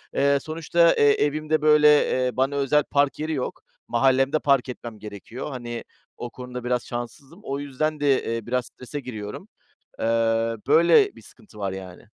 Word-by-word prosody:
Eee, 140 0 +3
sonuçta, 165 +1 +2
eee, 145 0 +5
evimde 155 +1 -1
böyle, 150 0 +5 0.2
eee, 130 0 +1
bana 135 +2 +1
özel 140 +1 +2
park 140 -1 0
yeri 155 +1 -2
yok. 130 - -4 0.3
Mahallemde 135 +4 +2
park 140 -4 +2
etmem 120 -3 -8
gerekiyor. 105 +6 -8
Hani 120 -3 -6 0.3
o 120 - -6
konuda 125 0 -8
biraz 125 0 -1
şanssızım. 125 - -7
O 140 +1 -4
yüzden 145 +2 -2
de, 140 -2 +2
eee, 115 -2 -5
biraz 125 0 -1
strese 135 +3 -8
giriyorum. 110 -6 -7 0.5
Eee, - - -3 0.6
böyle 170 - +5
bir - - -14
sıkıntı 210 - -17
var 100 -2 -2
yani. 95 -2 -9
135 Hz, 165 wpm, -24 LUFS, 120-150 Hz, 0.6 s, eee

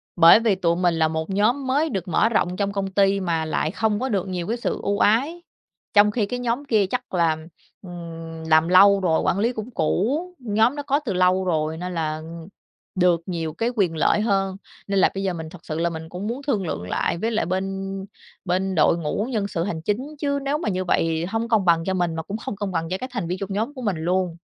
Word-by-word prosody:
bởi 170 +4 +8
vì 225 -4 +2
tụi 170 -2 +1
mình 175 -1 +2
là 160 -1 +3
một 160 0 -3
nhóm 235 +8 +1
mới 290 +5 +1
được 195 - -3
mở 180 +6 +2
rộng 180 -5 +1
trong 200 0 0
công 200 -1 -2
ty 195 0 +3
mà 165 -4 -1
lại 155 0 -1
không 210 +1 0
có 260 - -2
được 200 -5 -1
nhiều 180 -2 -3
cái 230 - -1
sự 235 - -2
ưu 200 0 0
ái. 280 +11 +2 0.5
Trong 210 0 +6
khi 215 -1 0
cái 245 +5 -4
nhóm 245 +3 -2
kia 220 -6 +3
chắc 250 +5 -4
là, 165 -3 +2 0.4
ừm, 165 -3 -8
làm 160 +1 +5
lâu 195 +2 +7
rồi, 165 -4 +1
quản 190 - +1
lý 235 +4 +1
cũng 220 +1 -6
cũ, 230 - 0 0.2
nhóm 225 +2 +2
đó 290 - -4
có 280 +1 +1
từ 245 -10 -3
lâu 185 +1 +2
rồi 160 -2 0
nên 180 +1 -5
là 155 -2 -2 0.7
được 175 -2 +3
nhiều 165 -4 -3
cái 225 +8 -1
quyền 185 -7 +1
lợi 185 - +3
hơn, 195 -3 0 0.3
nên 195 -1 +1
là - - +5
bây 195 0 -3
giờ 190 - 0
mình 160 -2 -6
thật 180 - -12
sự 155 0 -4
là 170 +1 +1
mình 160 -1 -7
cũng 180 +5 -5
muốn 240 +5 -3
thương 200 - 0
lượng 90 - -3
lại - - 0
với 225 +6 -1
lại 220 - 0
bên 195 +1 -3 0.4
bên 190 +1 0
đội 160 +1 +4
ngũ 170 +6 -2
nhân 210 -4 -1
sự 170 -4 -2
hành 170 -4 -3
chính, 255 - -3
chứ 280 -1 0
nếu 280 +2 0
mà 305 - -2
như 185 -1 -2
vậy 165 -1 +1
hông 225 +5 -2
công 220 -4 +2
bằng 165 -2 +4
cho 190 - 0
mình 175 -3 0
mà 160 - -3
cũng 205 +2 -5
không 215 - -5
công 205 -1 -4
bằng 165 -2 -2
cho 185 - -1
các 255 +6 -6
thành 170 - -2
viên 180 +2 -2
trong 195 0 -4
nhóm 225 +8 -2
của 260 - -8
mình 205 -7 -1
luôn. 175 +1 -1
190 Hz, 245 wpm, -23 LUFS, 170-220 Hz, 0.7 s, bởi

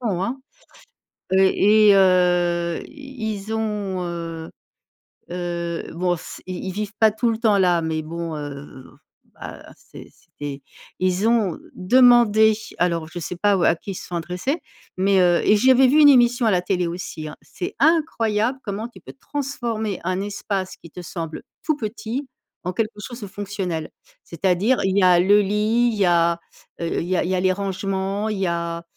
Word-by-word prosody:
grand, 195 -7 -1
hein, 260 +3 -4 0.9
heu, 190 - +4
et 205 +2 +5
heu, 175 -2 +2
i 270 -7 -6
ils 205 +2 -7
ont, 210 -4 -2
heu 165 -1 -6 0.8
heu, 175 -1 -3
bon 180 +1 0
s 165 - -10
ils 185 -1 -5
ils 190 - -3
vivent 210 +2 -4
pas 220 -1 +5
tout 230 +2 0
le 220 - -2
temps 220 -3 +3
là 180 -3 +3
mais 160 -1 -2
bon, 165 0 -5
heu, 140 -3 -8 0.5
bah, - - -10
c'est - - -14
c'est - - -29
des 140 -1 -5 0.4
ils 185 +4 +1
ont 220 -7 +1 0.2
demandé, 220 0 +5 0.2
alors 170 -2 0
je 175 - -7
sais 175 - -5
pas 205 +2 +2
ou 175 - -1
à 165 - +4
qui 195 - -7
ils - - -7
se - - -8
sont 175 - -4
adressés, 180 - -3 0.4
mais, 190 0 +3
heu 175 -1 +4
et 210 - +5
j'avais 260 +3 +5
vu 290 +5 +4
une 295 - +8
émission 245 -2 +5
à - - +4
la 180 -3 +2
télé 180 -1 0
aussi, 170 -3 -6
hein, - - -10
c'est 180 - -6
incroyable 260 -7 +1
comment 210 +3 -4
tu - - -16
peux - - -11
transformer 240 -8 -4
un 185 +1 -1
espace 200 -2 -4
qui 170 - -15
te 180 +3 -9
semble 165 -2 -6 0.2
tout 310 -2 +1
petit, 230 +3 -4 0.4
en 180 - -2
quelque 215 +2 -2
chose 240 +3 -8
de 205 - -6
fonctionnel. 190 -5 -4 0.3
C'est-à-dire, 190 +8 +1
il 190 0 +1
y - - +4
a 180 -1 +6
le 205 +3 +5
lit, 215 +4 +1
il 215 - -5
y 200 - +3
a, 170 -1 +2 0.4
heu, 170 - -1
il - - -4
y 185 - +1
a - - +1
il 180 - -2
y - - +1
a - - 0
les 185 0 +3
rangements, 195 +1 -2
il 210 -2 -3
y 190 - 0
a, 170 0 -3
195 Hz, 190 wpm, -22 LUFS, 175-220 Hz, 0.9 s, une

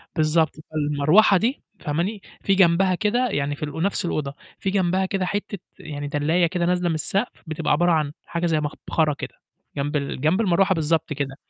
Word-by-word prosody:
بالضبط، 160 0 +2 0.2
فالمروحة 155 +7 +4
دي 240 +8 -1 0.2
فهماني؟ 175 +7 -2 0.2
في 195 - +2
جنبها 185 0 +4
كده 235 +6 +1
يعني 145 0 -1
في 145 - -8
ال 150 - -2
ونَفْس 180 +6 -1
الأوضة، 145 -5 -2 0.3
في 195 - -1
جنبها 190 -1 +1
كده 190 -1 -1
حتّة 205 +2 -3 0.2
يعني 145 -4 -6
دلّاية 155 +4 +2
كده 175 0 -1
نازلة 180 0 +1
من 160 - 0
السقف 195 - -2
بتبقى 155 0 -2
عبارة 175 +4 +3
عن 155 -3 +1
حاجة 170 0 -2
زي 160 -2 +2
مبخرة 150 +1 -1
كده - - -7 0.4
جنب 145 +2 -2
ال 140 -2 -2
جنب 165 +8 +2
المروحة 190 -1 +3
بالضبط 160 -1 0
كده. 135 -2 -3
170 Hz, 185 wpm, -23 LUFS, 150-190 Hz, 0.4 s, فالمروحة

